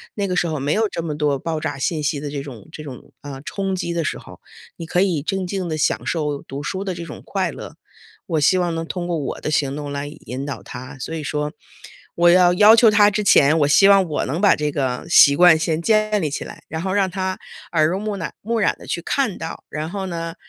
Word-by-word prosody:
那 200 -2 -1
个 180 - -2
时 175 - +1
候 155 -3 -3
没 145 +3 0
有 220 0 +1
这 170 - -4
么 155 -3 -3
多 145 -2 0
爆 160 +2 -3
炸 - - -3
信 155 +3 -1
息 145 0 -1
的 145 - -5
这 140 -1 -5
种 125 -8 -11
这 155 - -9
种， 130 -4 -11
呃， 140 -2 -8
冲 195 +2 -3
击 170 -2 -3
的 170 - -1
时 - - -3
候， - - -14 0.4
你 165 - -6
可 175 +2 0
以 180 -7 +1
静 190 +3 -2
静 185 -2 -3
地 155 - -2
享 150 - 0
受 150 -4 -2
读 140 +2 -7
书 190 +5 -3
的 190 -2 -3
这 170 -1 -7
种 150 - -9
快 - - -1
乐。 - - -10 0.5
我 160 - 0
希 185 +6 +4
望 175 -2 0
能 165 0 -3
通 175 0 -4
过 170 - -1
我 145 -3 -4
的 - - -3
行 140 -3 0
动 145 -1 -5
来 140 0 -4
引 135 -2 -7
导 140 - -5
他， 130 +2 -9
所 160 - -5
以 155 - -5
说， 150 +1 -3 0.6
我 175 0 +5
要 180 0 +5
要 210 +3 +8
求 230 -1 +6
他 205 0 +6
之 210 +1 -2
前， 155 -4 +5
我 145 - +3
希 195 +7 +6
望 195 -2 +6
我 155 -3 -2
能 150 +7 -3
把 205 - +6
这 150 0 -1
个 130 -4 -2
习 140 -4 +7
惯 175 -1 +7
先 160 0 -1
建 215 +1 +2
立 155 - -1
起 145 - -4
来， - - -11
然 160 +1 -5
后 190 - -2
让 195 -1 +1
他 185 0 -3 0.3
耳 155 -2 +3
濡 185 +3 -1
目 210 -1 -3
染 170 - -5
目 230 +2 -1
染 205 - +2
地 - - -13
去 170 - -3
看 225 +1 -1
到， 165 - -7
然 155 +1 -4
后 195 +1 -4
呢， 165 -1 -5
165 Hz, 280 characters per minute, -21 LUFS, 150-190 Hz, 0.6 s, 要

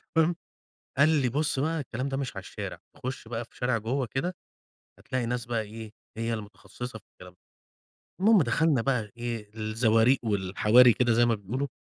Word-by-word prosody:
فاهم؟ 165 +1 +3 0.6
قال 145 +3 +6
لي: 145 -6 +2
"بُص 145 +2 0
بقى 160 +3 0
الكلام 130 -1 -4
ده 135 - -2
مش 135 -5 -4
على - - -6
الشارع - - -6 0.2
تخُش 130 -2 -6
بقى 120 0 -4
في - - -28
شارع 125 -1 +1
جوة 125 +4 -2
كده 175 +8 -2 0.6
هتلاقي 130 -2 -3
ناس 120 0 -2
بقى 115 -2 -1
إيه 110 0 -9 0.2
هي 115 +1 -1
المتخصصة 110 +2 -8
في 100 - -25
الكلام 90 0 -13
ده." 90 - -35 0.8
المهم 210 0 +6
دخلنا 145 +1 +2
بقى 115 -5 -1
إيه؟ 115 -3 -4
الزواريق 110 +3 +3
والحواري 105 +4 +5
كده 120 -2 +2
زي 120 +1 +4
ما 115 -1 +2
بيقولوا، 120 +8 -3
120 Hz, 180 wpm, -28 LUFS, 110-135 Hz, 0.8 s, قال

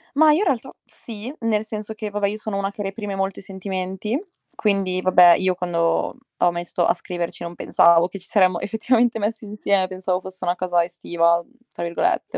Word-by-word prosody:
Mah, 310 +1 +6
io 300 - +4
in - - +2
realtà, 265 -6 0 0.2
sì, 230 +3 -8
nel 220 -2 0
senso 215 0 -5
che, 215 -1 -5
vabbè, 205 0 0
io 210 +2 -3
sono 215 -2 -4
una 195 0 -1
che 205 +1 -6
reprime 200 0 -4
molto 195 0 -2
i - - -10
sentimenti 190 +4 -4 0.4
quindi, 195 -3 +1
vabbè, 180 -2 +7
io 185 -1 +2
quando 170 -2 0 0.2
ho 175 - +3
mesto 175 0 -1
a - - +4
scriverci 175 -2 -5
non 170 0 -6
pensavo 170 0 +4
che 195 +2 -9
ci 185 - -6
saremmo 185 -4 +3
effettivamente 230 +2 +1
messi 220 +1 -3
insie 200 -2 0
pensavo 185 0 -2
fosse 185 0 -6
una 175 0 +1
cosa 180 -2 +1
"estiva", 170 -1 +1
mhmm, - - -30 0.2
tra - - -5
virgolette, 170 - -1
190 Hz, 200 wpm, -22 LUFS, 180-210 Hz, 0.4 s, vabbè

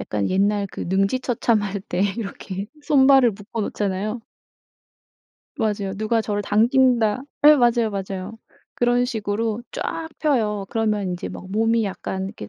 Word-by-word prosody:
약간 100 0 -2
옛날 200 +1 +1
그 - - -9
능지처참할 205 0 0
때 175 - -3 0.2
이렇게 195 -3 -5 0.2
손발을 270 -4 +5
묶어 205 +3 -6
놓잖아요. 205 +3 -2 1.3
맞아요. 210 -5 -1
누가 220 +2 +1
저를 205 -1 -2
당긴다 235 +1 +3 0.2
예 300 - +9
맞아요. 235 -3 +3
맞아요. 195 +2 -5 0.4
그런 245 0 +2
식으로 220 -1 -2
쫙 325 -1 -4
펴요. 215 -9 0
그러면 210 -4 0
인제 180 0 -4
막 190 - -9
몸이 225 +2 +2
약간 190 -1 -4
이렇게 110 - -8
215 Hz, 295 characters per minute, -22 LUFS, 195-235 Hz, 1.3 s, 예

